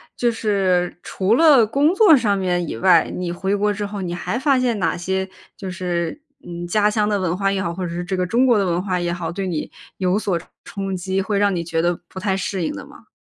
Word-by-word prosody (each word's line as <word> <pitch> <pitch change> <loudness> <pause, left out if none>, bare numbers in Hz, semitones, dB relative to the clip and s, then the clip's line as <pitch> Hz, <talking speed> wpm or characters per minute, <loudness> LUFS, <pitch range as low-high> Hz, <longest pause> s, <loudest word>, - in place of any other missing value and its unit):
就 240 -1 +1
是 195 -6 0
除 195 +4 +1
了 285 -5 +6
工 285 +8 +2
作 385 -5 +7
上 215 -6 +1
面 180 -2 -1
以 115 - -5
外， 170 +4 +4
你 180 -1 -3
回 190 +3 -1
国 205 +1 +1
之 205 0 -4
后， 205 0 -5
你 175 -2 -3
还 195 +7 -3
发 275 -1 +3
现 240 -4 0
哪 190 - 0
些 190 +2 -2 0.3
就 195 - -6
是， 175 - -3 0.2
嗯， 175 0 -6
家 210 +4 +2
乡 210 0 +1
的 205 -1 +1
文 180 -1 -1
化 195 0 +1
也 195 -1 -1
好， 170 -2 -2
或 185 +1 -4
者 - - -4
是 175 +1 -3
这 190 +2 -2
个 185 -1 0
中 235 +8 +2
国 240 -4 +4
的 200 - +1
文 175 -1 0
化 185 -2 -1
也 175 0 -1
好， 170 -2 -4
对 195 +3 -4
你 165 -4 -3 0.3
有 185 +1 +1
所 195 -5 -1
冲 165 - -16 0.2
冲 195 -1 -4
击， 190 +2 -2
会 200 +1 -1
让 200 0 +2
你 170 - -2
觉 165 -1 -1
得 175 0 0
不 185 - -9
太 190 0 0
适 190 -1 -3
应 - - -2
的 - - -8
吗？ - - -17
190 Hz, 275 characters per minute, -21 LUFS, 175-210 Hz, 0.3 s, 作